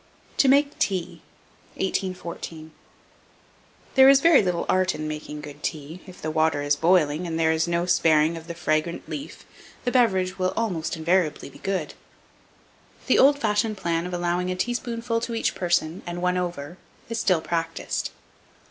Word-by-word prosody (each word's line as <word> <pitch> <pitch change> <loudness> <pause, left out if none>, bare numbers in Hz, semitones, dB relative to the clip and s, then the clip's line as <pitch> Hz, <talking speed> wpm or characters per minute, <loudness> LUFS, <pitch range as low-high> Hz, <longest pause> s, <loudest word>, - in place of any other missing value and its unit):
TO 275 - +3
MAKE 280 +2 +3
TEA. 185 -4 -1 0.5
1814. 170 -4 -4 1.2
There 265 0 +8
is 275 0 +7
very 330 +1 +6
little 180 -3 -1
art 185 -2 +2
in 155 0 -4
making 150 -1 -6
good 145 0 -10
tea; 155 +3 -5
if 185 - -12
the 155 - -3
water 155 -2 +1
is 145 0 +2
boiling, 165 0 +2
and 165 -1 -3
there 160 -1 +3
is 160 +1 +1
no 170 0 0
sparing 160 -2 +3
of 165 0 -9
the 170 - -6
fragrant 160 0 -1
leaf, 285 - -7 0.4
the 245 - +1
beverage 190 -7 +2
will 185 0 0
almost 180 -8 -2
invariably 165 -3 0
be - - -15
good. 190 -6 -2 1.1
The - - +3
old 280 +2 +6
fashioned 215 -2 0
plan 170 -1 -1
of 180 - -7
allowing 175 +1 -1
a 185 - -1
teaspoonful 230 +2 -2
to 235 0 -3
each 225 - 0
person, 170 -2 0
and 175 0 -4
one 180 0 +1
over, 175 -2 -4 0.3
is 230 0 -3
still 185 -6 +2
practised. 165 0 -3
175 Hz, 165 wpm, -24 LUFS, 160-195 Hz, 1.2 s, There